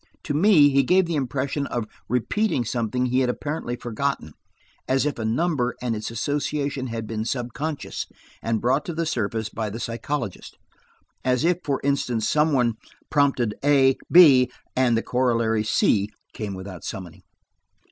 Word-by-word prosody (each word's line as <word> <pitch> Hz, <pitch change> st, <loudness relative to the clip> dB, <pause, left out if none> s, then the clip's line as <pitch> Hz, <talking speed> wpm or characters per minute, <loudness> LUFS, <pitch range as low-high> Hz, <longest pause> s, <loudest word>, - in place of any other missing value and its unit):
To 145 Hz, -, -3 dB
me, 155 Hz, -2 st, +6 dB
he 140 Hz, 0 st, +4 dB
gave 180 Hz, +7 st, +3 dB
the 170 Hz, -, -3 dB
impression 140 Hz, +1 st, -1 dB
of 120 Hz, -3 st, -2 dB, 0.2 s
repeating 125 Hz, -, 0 dB
something 120 Hz, +2 st, -1 dB
he 125 Hz, +1 st, +1 dB
had 130 Hz, -2 st, +2 dB
apparently 145 Hz, -2 st, -3 dB
forgotten. 120 Hz, -, -3 dB, 0.5 s
As 135 Hz, +2 st, +2 dB
if 145 Hz, -4 st, -2 dB
a 110 Hz, -, -2 dB
number 125 Hz, +1 st, 0 dB
and 120 Hz, -2 st, -2 dB
its 105 Hz, 0 st, -4 dB
association 140 Hz, +2 st, -2 dB
had 115 Hz, -2 st, -4 dB
been 110 Hz, 0 st, -3 dB
subconscious, 135 Hz, +6 st, -4 dB, 0.3 s
and 115 Hz, -1 st, 0 dB
brought 130 Hz, +4 st, +2 dB
to 170 Hz, -, -5 dB
the 165 Hz, +1 st, -1 dB
surface 110 Hz, -6 st, -1 dB
by 110 Hz, -1 st, -3 dB
the 110 Hz, +3 st, -6 dB
psychologist; 115 Hz, -2 st, -4 dB, 0.7 s
as 125 Hz, +3 st, +1 dB
if, 175 Hz, 0 st, +2 dB
for 140 Hz, -2 st, -1 dB
instance, 125 Hz, -5 st, 0 dB
some 150 Hz, +1 st, +3 dB
one 120 Hz, -5 st, +2 dB, 0.3 s
prompted 135 Hz, -7 st, +2 dB
a–b, 135 Hz, -1 st, +6 dB, 0.2 s
and 125 Hz, -3 st, +3 dB
the 115 Hz, -, -1 dB
corollary 115 Hz, -3 st, +1 dB
"c" 105 Hz, -1 st, +2 dB, 0.2 s
came 105 Hz, -3 st, -5 dB
without 95 Hz, -2 st, -8 dB
summoning. 90 Hz, -4 st, -7 dB
125 Hz, 155 wpm, -24 LUFS, 115-145 Hz, 0.7 s, me